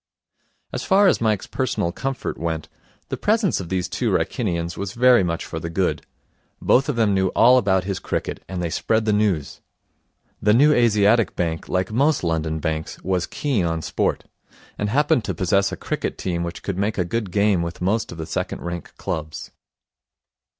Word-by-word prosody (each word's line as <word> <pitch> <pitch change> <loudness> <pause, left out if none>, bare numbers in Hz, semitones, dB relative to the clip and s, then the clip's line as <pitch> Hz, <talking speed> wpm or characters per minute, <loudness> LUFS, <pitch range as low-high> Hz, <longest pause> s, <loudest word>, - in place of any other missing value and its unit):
As - - -3
far 200 +1 +4
as 190 - +3
Mike's 110 -3 +1
personal 120 -9 -1
comfort 135 +7 -4
went, 80 -2 -3 0.4
the - - -3
presence 215 -3 +1
of 90 -3 -6
these 90 -1 -1
two - - -1
Wrykinians 85 -6 -1
was 100 -1 -5
very 125 -3 +5
much 85 -1 -2
for 80 - -5
the 85 - -5
good. 90 +2 0 0.6
Both 135 +3 +3
of 145 - 0
them 110 -3 +2
knew 95 -1 +2
all 125 +2 +6
about 95 -4 +2
his 95 0 -3
cricket, - - -4
and 90 -2 -3
they 85 - -2
spread 110 +5 0
the 105 - +2
news. 100 -9 0 0.8
The 105 +1 +4
New 150 +5 +6
Asiatic 115 -2 +3
Bank, 80 -2 -2
like 95 +2 0
most 140 +4 +2
London 80 -2 -1
banks, 80 0 -3
was 90 -1 0
keen 135 -10 -1
on 80 -1 -1
sport, - - -1 0.5
and 105 - -2
happened 140 -1 +2
to - - -3
possess 100 +1 +2
a - - -5
cricket - - -3
team 85 -2 -2
which 85 0 -5
could 95 -2 -3
make 105 +2 0
a 90 - +1
good 105 +3 -2
game 100 -1 +2
with 85 +1 -4
most 110 +5 0
of 85 - -8
the 80 - -4
second - - -4
rank 85 -2 -6
clubs. 75 -1 -5
95 Hz, 185 wpm, -22 LUFS, 85-115 Hz, 0.8 s, all